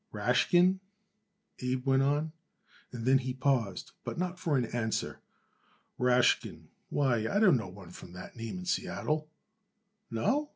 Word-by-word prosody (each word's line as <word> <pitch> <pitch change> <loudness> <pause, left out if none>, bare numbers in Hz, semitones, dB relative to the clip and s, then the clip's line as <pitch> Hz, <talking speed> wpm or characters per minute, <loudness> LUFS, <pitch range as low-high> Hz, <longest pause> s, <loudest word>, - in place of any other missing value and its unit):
"Rashkin?" 180 +1 +3 0.8
Abe 125 +1 -2
went 135 0 +4
on, 145 +3 +1 0.6
and 120 -2 -6
then 130 +1 +5
he 130 -1 -4
paused, 125 -8 0
but - - -5
not 180 +1 -2
for 155 -6 +1
an 125 - +1
answer. 110 -1 -2 0.8
"Rashkin 125 0 +2 0.2
why, 135 -4 +2
I 200 - 0
don't 200 -7 +6
know 115 -5 -1
no - - -7
one 90 -1 -11
from 90 0 -11
that 90 - -9
name 115 +8 -5
in 180 - -7
Seattle." 155 -3 -1 0.8
"No?" 280 - 0
130 Hz, 150 wpm, -31 LUFS, 120-160 Hz, 0.8 s, don't